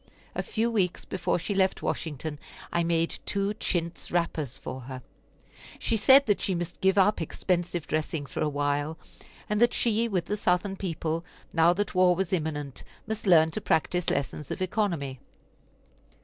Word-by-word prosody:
A -, -, -1 dB
few 230 Hz, +1 st, -1 dB
weeks 185 Hz, -6 st, 0 dB
before 185 Hz, -2 st, -1 dB
she 190 Hz, +4 st, -3 dB
left 190 Hz, -1 st, +1 dB
Washington 150 Hz, -1 st, -3 dB, 0.3 s
I 170 Hz, -, +2 dB
made 165 Hz, 0 st, 0 dB
two 200 Hz, 0 st, 0 dB
chintz 170 Hz, -5 st, -2 dB
wrappers 165 Hz, -6 st, -1 dB
for 130 Hz, -, -6 dB
her. 130 Hz, -2 st, -7 dB, 0.7 s
She 230 Hz, -, 0 dB
said 265 Hz, +6 st, +7 dB
that 205 Hz, -3 st, +2 dB
she 190 Hz, -, 0 dB
must 175 Hz, 0 st, -5 dB
give 190 Hz, +1 st, +3 dB
up 200 Hz, 0 st, +4 dB
expensive 175 Hz, 0 st, -1 dB
dressing 155 Hz, -1 st, -2 dB
for -, -, -5 dB
a 155 Hz, -, +2 dB
while; 145 Hz, +2 st, -1 dB, 0.5 s
and 210 Hz, +1 st, 0 dB
that 240 Hz, -, +4 dB
she, 230 Hz, 0 st, +2 dB
with 185 Hz, -6 st, -1 dB
the 210 Hz, -, -2 dB
Southern 190 Hz, 0 st, +1 dB
people, 165 Hz, -3 st, -2 dB, 0.3 s
now 165 Hz, +1 st, +5 dB
that 205 Hz, +2 st, -2 dB
war 185 Hz, -1 st, +5 dB
was 190 Hz, 0 st, -1 dB
imminent, 150 Hz, -5 st, -2 dB, 0.2 s
must 220 Hz, -1 st, -4 dB
learn 160 Hz, -3 st, +6 dB
to -, -, -4 dB
practise 175 Hz, +2 st, +1 dB
lessons 140 Hz, +1 st, -2 dB
of -, -, -4 dB
economy. 175 Hz, -, -1 dB
175 Hz, 165 wpm, -28 LUFS, 155-195 Hz, 0.7 s, said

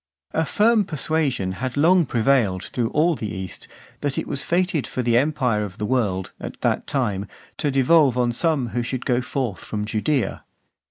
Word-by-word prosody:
A 160 Hz, -, 0 dB
firm 220 Hz, 0 st, +3 dB
persuasion 150 Hz, -, -1 dB
had 130 Hz, +7 st, -4 dB
long 170 Hz, +2 st, +4 dB
prevailed 115 Hz, -6 st, +2 dB
through 120 Hz, -3 st, -2 dB
all 165 Hz, +3 st, +2 dB
the 110 Hz, -8 st, -4 dB
East, 95 Hz, -2 st, -7 dB, 0.3 s
that 145 Hz, -2 st, -2 dB
it -, -, -1 dB
was 140 Hz, -, -1 dB
fated 175 Hz, -4 st, 0 dB
for 125 Hz, -, -3 dB
the 120 Hz, -1 st, +2 dB
empire 125 Hz, -5 st, +2 dB
of 100 Hz, -1 st, -7 dB
the 105 Hz, -, -2 dB
world, 105 Hz, -6 st, 0 dB
at -, -, -7 dB
that -, -, 0 dB
time, 105 Hz, -8 st, -1 dB, 0.3 s
to 145 Hz, -, 0 dB
devolve 135 Hz, 0 st, +4 dB
on 120 Hz, -1 st, +2 dB
some 140 Hz, -1 st, 0 dB
who 120 Hz, +4 st, -1 dB
should 125 Hz, +1 st, -4 dB
go 125 Hz, 0 st, +2 dB
forth 125 Hz, -7 st, -3 dB
from 105 Hz, -1 st, -3 dB
Judaea. 115 Hz, +5 st, -1 dB
130 Hz, 180 wpm, -23 LUFS, 110-150 Hz, 0.3 s, long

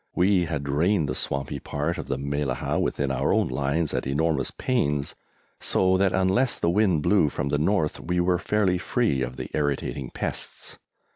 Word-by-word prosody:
We 90 Hz, 0 st, +3 dB
had 75 Hz, -4 st, -3 dB
drained 80 Hz, +4 st, +1 dB
the 65 Hz, -, -2 dB
swampy 70 Hz, +1 st, -3 dB
part 75 Hz, +4 st, -3 dB
of -, -, -6 dB
the 65 Hz, -, -1 dB
Mellahah 70 Hz, -1 st, -2 dB
within 70 Hz, -1 st, -1 dB
our 65 Hz, +1 st, 0 dB
own -, -, +2 dB
lines 70 Hz, +4 st, -1 dB
at -, -, -2 dB
enormous 75 Hz, 0 st, +1 dB
pains, 75 Hz, -, -1 dB, 0.5 s
so 95 Hz, 0 st, +2 dB
that 95 Hz, 0 st, +3 dB
unless 95 Hz, +8 st, +2 dB
the 85 Hz, -, +1 dB
wind 90 Hz, -6 st, +2 dB
blew 90 Hz, -5 st, +4 dB
from 70 Hz, 0 st, -3 dB
the 75 Hz, -, +1 dB
north, 80 Hz, -1 st, +1 dB
we 90 Hz, +1 st, -1 dB
were 90 Hz, 0 st, +2 dB
fairly 95 Hz, -4 st, +1 dB
free 105 Hz, -, 0 dB
of 65 Hz, 0 st, -3 dB
the -, -, -6 dB
irritating 70 Hz, -3 st, -2 dB
pests. -, -, -5 dB
75 Hz, 180 wpm, -25 LUFS, 70-95 Hz, 0.5 s, blew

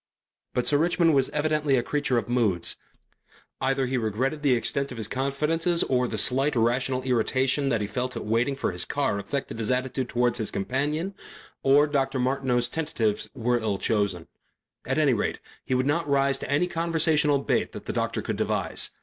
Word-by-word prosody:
But 125 Hz, -, +1 dB
Sir 145 Hz, -, +3 dB
Richmond 170 Hz, 0 st, +3 dB
was 135 Hz, -2 st, +2 dB
evidently 150 Hz, -2 st, +1 dB
a 120 Hz, -, +1 dB
creature 140 Hz, -2 st, 0 dB
of 115 Hz, -, -1 dB
moods. 115 Hz, -8 st, +1 dB, 0.9 s
Either 135 Hz, 0 st, +1 dB
he 130 Hz, +1 st, -1 dB
regretted 125 Hz, +7 st, -1 dB
the 140 Hz, -4 st, +3 dB
extent 140 Hz, +3 st, -1 dB
of 125 Hz, -, -7 dB
his 110 Hz, -2 st, -3 dB
confidences 150 Hz, +7 st, 0 dB
or 125 Hz, -1 st, +1 dB
the 110 Hz, -, -4 dB
slight 135 Hz, +6 st, +2 dB
irrational 125 Hz, +3 st, +1 dB
irritation 130 Hz, +3 st, +1 dB
that 115 Hz, -4 st, +1 dB
he -, -, 0 dB
felt 125 Hz, +5 st, -3 dB
at -, -, -5 dB
waiting 115 Hz, +5 st, +1 dB
for 135 Hz, -, -1 dB
his 90 Hz, 0 st, 0 dB
car 140 Hz, -8 st, -1 dB
affected 115 Hz, +2 st, -4 dB
his 110 Hz, -, -2 dB
attitude 130 Hz, 0 st, -1 dB
towards 120 Hz, 0 st, +1 dB
his 110 Hz, -, -1 dB
companion, 145 Hz, -, -2 dB, 0.5 s
or 140 Hz, +2 st, +5 dB
Dr. 135 Hz, -2 st, 0 dB
Martineau's 125 Hz, -1 st, +1 dB
tentatives 120 Hz, -8 st, -2 dB
were 120 Hz, 0 st, +1 dB
ill 105 Hz, -3 st, -1 dB
chosen. 100 Hz, -6 st, -1 dB, 0.6 s
At -, -, 0 dB
any -, -, +4 dB
rate -, -, -1 dB, 0.3 s
he 130 Hz, -, -1 dB
would 130 Hz, +1 st, +1 dB
not 150 Hz, +2 st, 0 dB
rise 140 Hz, -1 st, +2 dB
to -, -, -6 dB
any 145 Hz, +5 st, +2 dB
conversational 160 Hz, -4 st, +2 dB
bait 140 Hz, -, 0 dB
that -, -, -8 dB
the -, -, -3 dB
doctor -, -, -1 dB
could -, -, -3 dB
devise. -, -, 0 dB
130 Hz, 185 wpm, -26 LUFS, 120-145 Hz, 0.9 s, or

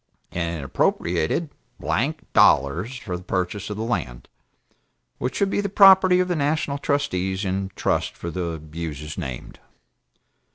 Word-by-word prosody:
And 85 Hz, -1 st, -2 dB
it -, -, -6 dB
appropriated 85 Hz, -, 0 dB, 0.3 s
[blank] 115 Hz, -, -1 dB
dollars 85 Hz, -, +3 dB
for 95 Hz, -7 st, -5 dB
the 90 Hz, -, -6 dB
purchase 90 Hz, +2 st, -3 dB
of 105 Hz, -, -4 dB
the 110 Hz, -, -2 dB
Land, 85 Hz, -, -3 dB, 0.9 s
which 125 Hz, -, -2 dB
should 195 Hz, -1 st, +1 dB
be -, -, +1 dB
the 200 Hz, -, -2 dB
property 190 Hz, -2 st, +7 dB
of 180 Hz, -, +2 dB
the 180 Hz, -, 0 dB
national 145 Hz, -1 st, 0 dB
trustees 95 Hz, -10 st, -1 dB
in 95 Hz, +1 st, -2 dB
trust -, -, -1 dB
for 85 Hz, -, -5 dB
the 85 Hz, -1 st, -3 dB
uses 75 Hz, -2 st, -5 dB
named. 65 Hz, -3 st, -7 dB
95 Hz, 150 wpm, -23 LUFS, -, 0.9 s, property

